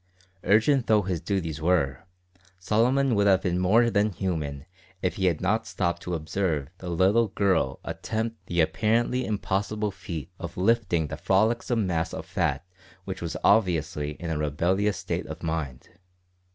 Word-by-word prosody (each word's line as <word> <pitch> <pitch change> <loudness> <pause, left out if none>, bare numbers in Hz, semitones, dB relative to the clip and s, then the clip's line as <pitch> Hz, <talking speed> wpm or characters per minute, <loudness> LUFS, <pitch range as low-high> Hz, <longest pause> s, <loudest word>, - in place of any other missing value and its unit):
Urgent 115 +7 +3
though 105 -2 +4
his 90 -3 -2
duties 85 -6 -2
were, 80 -3 +1 0.5
Solomon 120 +7 +2
would 100 -1 +3
have 95 -1 +4
been 90 -1 0
more 115 +6 +4
than 105 0 +2
human 80 -7 -3 0.4
if 90 - -1
he 95 -2 +2
had 85 -4 +1
not 110 +4 0
stopped 85 0 -1
to 90 - -3
observe 80 -3 -2
the 90 - -6
little 95 +7 +3
girl 95 -10 +1
attempt 115 +1 -4
the 85 -1 +1
apparently 115 +8 +1
impossible 105 0 -1
feat 90 -3 -7
of 85 0 -7
lifting 95 -5 +2
the - - -5
frolicsome 110 +3 +1
mass 85 -3 -1
of - - -6
fat - - -1 0.4
which 95 -1 -5
was 85 -1 -3
obviously 80 -8 +2
in 85 +2 -6
a 75 - -1
rebellious 90 +8 +1
state - - -3
of - - -8
mind. 80 -6 -4
95 Hz, 155 wpm, -26 LUFS, 85-105 Hz, 0.5 s, though